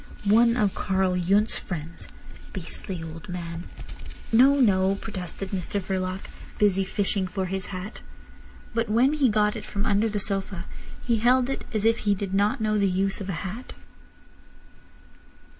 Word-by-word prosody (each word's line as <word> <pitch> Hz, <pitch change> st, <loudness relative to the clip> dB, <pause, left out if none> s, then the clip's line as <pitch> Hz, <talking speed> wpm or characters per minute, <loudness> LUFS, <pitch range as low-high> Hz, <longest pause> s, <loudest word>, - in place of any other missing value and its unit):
"One 230 Hz, +3 st, +5 dB
of 205 Hz, -4 st, +2 dB
Karl 190 Hz, -2 st, +1 dB
Yundt's 195 Hz, +5 st, +2 dB
friends—beastly 165 Hz, +1 st, -7 dB
old 165 Hz, +2 st, -9 dB
man." 170 Hz, -1 st, -5 dB, 0.7 s
"No! 260 Hz, +5 st, +7 dB
No!" 195 Hz, -5 st, +4 dB
protested 195 Hz, -2 st, -6 dB
Mr 195 Hz, +1 st, -2 dB
Verloc, 185 Hz, 0 st, -2 dB, 0.4 s
busy 195 Hz, -2 st, +3 dB
fishing 195 Hz, 0 st, 0 dB
for 190 Hz, +1 st, -2 dB
his 190 Hz, 0 st, -3 dB
hat. 190 Hz, +3 st, -7 dB, 0.7 s
But 230 Hz, -1 st, 0 dB
when 245 Hz, +7 st, +4 dB
he 285 Hz, -5 st, +3 dB
got 210 Hz, 0 st, +2 dB
it -, -, -5 dB
from 200 Hz, +1 st, -3 dB
under 210 Hz, +1 st, +2 dB
the 210 Hz, -, -2 dB
sofa 195 Hz, -3 st, -3 dB, 0.4 s
he 235 Hz, -2 st, +2 dB
held 250 Hz, +3 st, +3 dB
it -, -, -4 dB
as 215 Hz, -1 st, -1 dB
if 230 Hz, +1 st, +4 dB
he 205 Hz, -1 st, +2 dB
did 195 Hz, 0 st, -4 dB
not 200 Hz, +2 st, +2 dB
know 215 Hz, -1 st, +1 dB
the 200 Hz, -1 st, +3 dB
use 195 Hz, +2 st, 0 dB
of 195 Hz, -, -5 dB
a -, -, -1 dB
hat. 215 Hz, +7 st, -6 dB
200 Hz, 155 wpm, -26 LUFS, 185-215 Hz, 0.7 s, No